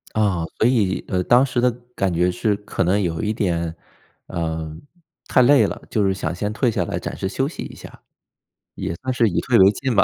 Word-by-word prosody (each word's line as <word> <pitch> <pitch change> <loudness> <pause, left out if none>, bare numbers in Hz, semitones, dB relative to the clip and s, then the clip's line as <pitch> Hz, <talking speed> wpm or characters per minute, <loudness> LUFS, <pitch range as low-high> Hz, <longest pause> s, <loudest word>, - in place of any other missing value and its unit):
啊， 100 -6 +1
所 115 - +3
以， 105 -7 +1
呃， 90 -1 0
当 120 +6 +5
时 125 -2 -1
的 125 - +4 0.3
感 95 -5 0
觉 90 +2 +2
是 100 +3 0
可 105 -2 -2
能 95 +4 +2
有 85 -4 -2
一 105 - 0
点， 85 -7 -1 0.5
呃， 80 -2 -3 0.5
太 - - +4
累 120 -6 +5
了， - - -5
就 105 - +1
是 95 - +2
想 85 -3 -3
先 105 +4 -3
退 120 +2 +1
下 105 -5 0
来 100 - -3
暂 - - -5
时 95 - -3
休 135 +5 -1
息 155 - -7
一 - - -9
下， - - -13 0.7
也 - - -3
算 130 +9 -3
是 120 -2 +3
以 90 - 0
退 125 -3 +2
为 95 0 +7
进 130 +3 -2
吧。 - - +6
100 Hz, 240 characters per minute, -21 LUFS, 90-120 Hz, 0.7 s, 为